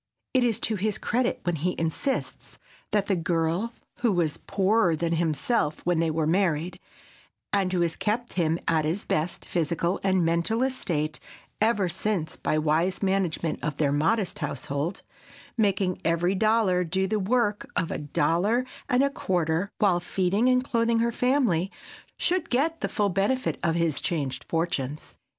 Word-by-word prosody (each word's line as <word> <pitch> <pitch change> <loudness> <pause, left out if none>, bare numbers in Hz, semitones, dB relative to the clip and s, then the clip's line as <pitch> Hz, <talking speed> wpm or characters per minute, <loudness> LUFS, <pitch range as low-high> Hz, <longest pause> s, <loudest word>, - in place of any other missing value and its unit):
It 255 -1 +4
is 235 -3 +1
to 220 -1 0
his 210 +2 -1
credit 245 +3 0
when 175 -2 0
he 180 +5 -1
insists 165 - -2 0.3
that 205 -2 +1
the 195 - +1
girl 170 +5 0 0.3
who 240 -3 +2
was 170 -5 0
poorer 195 -3 +3
than 170 +1 -1
himself 160 - 0
when 175 -2 +2
they 165 -1 +2
were 160 0 0
married, 175 0 0 0.7
and 195 -2 +2
who 180 -2 +1
has 170 -1 +1
kept 235 +3 -1
him 165 -2 +1
at 160 -1 +2
his 165 +6 -1
best 155 +3 -1
physical 170 +2 0
and 190 -3 +2
mental 170 +9 +1
estate 155 - -1 0.4
ever 215 -3 +3
since 185 -1 -2
by 155 - -1
wise 160 +6 +1
management 185 -4 0
of 150 -1 -2
their 145 -3 +2
modest 165 +8 +1
household—making 180 - -3
every 170 +3 +2
dollar 215 -3 +2
do 190 +3 0
the 210 +2 0
work 210 0 0
of 170 -2 0
a - - -3
dollar 170 - +1 0.2
and 250 +2 +4
a 280 - +3
quarter 175 - 0
while 190 -4 +3
feeding 190 +6 +1
and 255 0 +3
clothing 230 -2 +1
her 235 +1 +2
family—should 250 - -1
get 315 +6 +1
the - - -1
full 205 -3 +1
benefit 200 +8 0
of 165 -1 +1
his 165 -4 +1
changed 135 -7 -2
fortunes. 160 -4 -2
180 Hz, 155 wpm, -26 LUFS, 165-215 Hz, 0.7 s, It